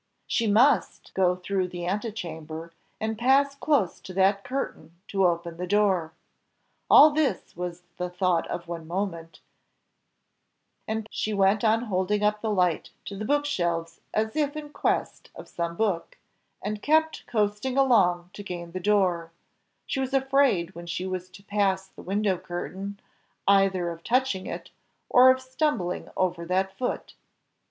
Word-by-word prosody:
She 230 -3 0
MUST 240 +6 +3
go 180 -1 +3
through 185 0 -1
the 175 -1 -6
antechamber, 170 -5 -4 0.3
and 220 0 -2
pass 275 +3 +4
close 275 - +1
to 185 - -10
that 195 +1 +3
curtain 170 - -5
to 195 -2 +3
open 170 -1 -2
the 180 +1 -4
door. 190 -5 +2 0.8
All 305 - +9
this 290 - -1
was 175 0 -5
the 180 0 -2
thought 180 -2 +1
of 170 -1 -5
one 165 -2 -6
moment, 170 -2 -4 1.5
and 220 0 -2
she 215 -1 -2
went 200 +2 +3
on 225 +1 +3
holding 205 -1 0
up 210 0 +2
the 220 - -1
light 180 -5 +1 0.2
to 200 - -6
the 210 +2 -4
book 290 +4 +2
shelves 170 -9 -2
as 220 +3 -1
if 300 -1 0
in 300 -1 -6
quest - - -1
of - - -10
some 170 0 -3
book, 195 -4 -1 0.5
and 210 +1 -3
kept 315 +3 +2
coasting 215 +4 0
along 180 -10 +3
to 205 - -8
gain 175 -3 -6
the 185 - -4
door; 185 -4 +1 0.5
she - - -2
was 265 0 -1
afraid 265 -10 +2
when 170 -1 -9
she 170 +2 -3
was 185 -1 -4
to 195 +1 -15
pass 200 -2 +1
the - - -13
window 195 -1 0
curtain, 190 +2 -6 0.5
either 195 -3 +3
of 165 0 -10
touching 245 -6 +1
it, - - -7 0.4
or 255 +1 +8
of 260 0 +4
stumbling 260 - -2
over 180 -2 0
that 190 +2 0
foot. 245 +4 -3
195 Hz, 155 wpm, -26 LUFS, 175-225 Hz, 1.5 s, All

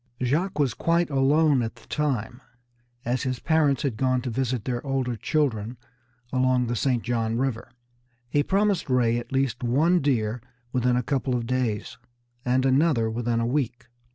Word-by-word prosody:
Jacques 155 +10 0
was 140 -6 +1
quite 170 +2 +1
alone 140 +1 +3
at 115 -1 -4
the - - -18
time, 130 -4 -2 0.6
as 125 +2 0
his 130 -2 -2
parents 150 -4 +2
had 130 -7 -1
gone 130 0 +1
to 125 0 -4
visit 125 -1 -2
their 120 -2 -2
older 135 -3 -1
children 120 -2 -1 0.6
along 130 -1 +2
the 120 +1 -2
St. 125 -1 0
John 115 -1 -1
River. 125 -3 -2 0.6
He 145 +4 +1
promised 195 +1 +1
Ray 120 -2 +2
at 120 - -10
least 135 -2 0
one 155 +9 +3
deer 120 -4 0 0.3
within 125 -1 +2
a 125 - 0
couple 130 0 -1
of 120 -1 -2
days, 120 -4 -2 0.4
and 130 +1 +1
another 135 -4 +3
within 120 0 -1
a 115 - 0
week. 125 -2 -2
130 Hz, 165 wpm, -25 LUFS, 120-140 Hz, 0.6 s, alone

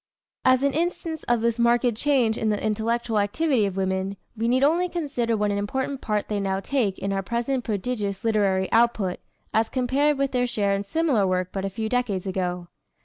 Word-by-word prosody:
As 255 +1 +4
an 280 -1 +2
instance 330 -1 -2
of 240 -2 +2
this 235 0 0
marked 235 0 +3
change 250 -3 +2
in 220 - -1
the 210 -1 0
intellectual 225 +1 0
activity 225 +2 +1
of 195 -1 -5
women, 190 +1 -1 0.2
we 225 +1 -1
need 255 +3 +3
only 340 +5 +3
consider 260 -10 -1
what 210 0 +1
an 200 - -1
important 265 +6 -2
part 210 -2 -1
they 210 -1 -1
now 195 -1 -1
take 210 -4 -1
in 195 0 -2
our 195 - 0
present 240 +6 -2
prodigious 205 -2 -3
literary 200 -4 +2
output, 225 -5 +2 0.3
as 220 0 +2
compared 275 +3 +1
with 275 0 0
their 250 -1 +1
share 205 -4 0
in 195 0 -1
similar 270 -5 +1
work 185 -1 0
but 195 -1 -2
a - - -1
few 220 +3 -3
decades 220 -6 -1
ago. 180 -2 -2
225 Hz, 200 wpm, -25 LUFS, 200-255 Hz, 0.3 s, As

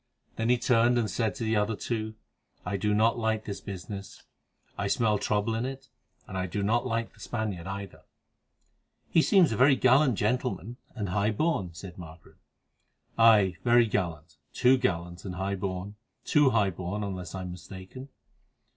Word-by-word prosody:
Then 115 +1 -1
he 125 - +4
turned 120 0 +3
and 115 -2 +1
said 115 -1 -1
to 130 - -5
the 110 0 +1
other 105 +1 +1
two: 110 0 -3 0.5
"I 100 - -2
do 105 +2 0
not 110 +3 +3
like 110 -1 -1
this 100 -2 -5
business. 100 0 -8 0.5
I 100 - -2
smell 105 -1 +2
trouble 105 +2 0
in 115 +1 -1
it, 130 0 -6 0.4
and 95 -2 -4
I 95 - -1
do 100 +3 -3
not 120 +5 +1
like 115 -1 -2
the - - -22
Spaniard 105 -6 -4
either." 100 0 -7 1.1
"He 165 - +5
seems 180 - +4
a 110 - -1
very 135 +2 +6
gallant 130 0 +4
gentleman, 120 +1 -1 0.2
and 105 -6 -3
high 100 +3 +1
born," 105 - -1
said 90 +2 -9
Margaret. 80 -1 -12 0.8
"Aye, 105 -6 +5
very 120 -1 +5
gallant—too 85 - 0
gallant, 85 -7 -2
and 90 -2 -6
high 95 +2 -2
born—too 100 +9 -1
high 105 -6 +2
born, 95 +4 -4
unless 95 -2 -5
I 95 - -4
am 90 -1 -5
mistaken. 95 +9 -10
105 Hz, 165 wpm, -28 LUFS, 95-120 Hz, 1.1 s, very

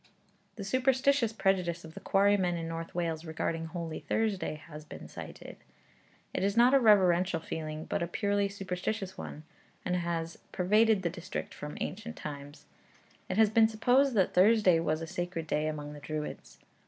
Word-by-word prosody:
The 205 - -6
superstitious 260 +2 +2
prejudice 185 -5 0
of 160 - -11
the - - -8
quarrymen 195 -3 +3
in 165 -1 -4
North 165 0 -6
Wales 165 -2 -1
regarding 165 0 -3
Holy 165 -2 -5
Thursday 210 -7 -1
has 150 0 -11
been - - -10
cited. - - -9 0.8
It - - -1
is 200 +2 0
not 245 +3 +6
a 275 - +7
reverential 185 -6 +4
feeling, 155 -1 -5
but - - -2
a 170 - 0
purely 200 +3 0
superstitious 195 +1 -4
one, 150 - -8 0.4
and 180 - 0
has 170 -1 -3
pervaded 210 +2 +3
the 170 - 0
district 185 +1 -6
from 150 0 -7
ancient 220 +4 -4
times. 145 -1 -8 0.6
It 185 - -2
has 220 -2 +5
been 220 0 +6
supposed 245 +4 +3
that 190 -3 +2
Thursday 190 -2 +5
was 160 0 -1
a - - -3
sacred 175 0 -4
day 155 -1 0
among 150 -1 -4
the 145 - -9
Druids. 150 +1 -6
180 Hz, 165 wpm, -30 LUFS, 165-210 Hz, 0.8 s, a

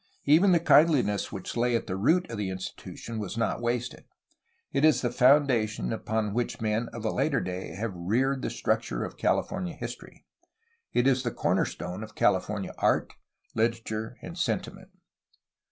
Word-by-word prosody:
Even 165 +7 +6
the 170 - +5
kindliness 145 -9 +4
which 95 - -6
lay 120 0 +2
at 115 - -1
the 95 - -3
root 165 - +2
of 115 - -4
the 100 -2 -1
institution 95 +4 -6
was 105 +1 -5
not 115 0 0
wasted. 120 +1 -2 0.7
It 140 - 0
is 155 -3 +4
the 120 - +1
foun 140 +3 +6
dation 110 - -1
upon 110 -2 -2
which 120 +1 -2
men 110 +2 -1
of 115 -1 -7
a 110 - +1
later 140 -5 +1
day 90 -3 -5
have 105 +1 -3
reared 125 +10 0
the - - -2
struc - - 0
ture - - -4
of - - -6
California 185 -3 -1
history. - - -8 0.7
It 120 - +2
is 135 -1 +3
the 125 - -1
cornerstone 90 -4 -1
of 110 - -11
California - - +1
art, - - +2 0.4
Hterature, 115 -1 -1
and - - -7
sentiment. - - -2
115 Hz, 170 wpm, -28 LUFS, 105-135 Hz, 0.7 s, Even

